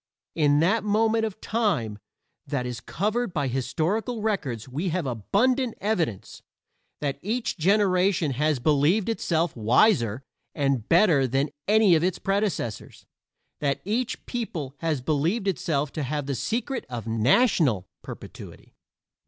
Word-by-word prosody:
In 145 -2 +3
that 195 +7 +2
moment 220 +2 +2
of 215 -1 -6
time 165 - -1 0.5
that 125 -3 -2
is 125 -1 -4
covered 215 +4 -2
by 145 -3 0
historical 165 - -1
records 140 - -2
we 150 +9 -3
have 170 -1 -1
abundant 225 - 0
evidence 170 - -2 0.6
that 140 -1 -2
each 230 +5 -2
generation 185 -2 +2
has 150 +3 +1
believed 155 - +2
itself 170 -6 0
wiser 120 - +3 0.3
and 135 -6 0
better 165 -7 +4
than 135 +4 0 0.2
any 210 -2 +5
of 160 0 +3
its 185 0 0
predecessors; 195 - -2 0.5
that 140 -2 0
each 235 +5 -2
people 175 - -4
has 160 -5 -1
believed 160 - 0
itself 150 -6 -1
to 155 - -4
have 145 +1 -2
the 140 - -2
secret 240 - -2
of 120 -4 -5
national 115 - +2
perpetuity. - - -11
165 Hz, 130 wpm, -25 LUFS, 135-210 Hz, 0.6 s, any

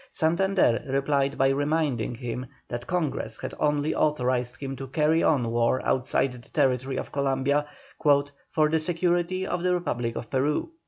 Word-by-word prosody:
Santander 170 -6 +2
replied 140 +1 +1
by 135 0 +4
reminding 140 -4 0
him 125 +1 -5 0.2
that 120 0 -5
Congress 170 -5 -2
had - - -5
only 150 0 +1
authorised 125 -4 0
him 135 -1 -4
to 135 +1 -7
carry 155 +4 +2
on 125 -7 +2
war 120 +2 +2
outside 130 +1 +1
the 125 - -10
territory 130 -2 +1
of - - -5
Columbia 140 +1 +1 0.8
"for 155 -1 +3
the 160 +1 +1
security 175 +2 0
of 175 -2 -2
the 180 0 +2
Republic 120 -9 -2
of 115 - -5
Peru." 145 - 0
140 Hz, 155 wpm, -26 LUFS, 130-160 Hz, 0.8 s, by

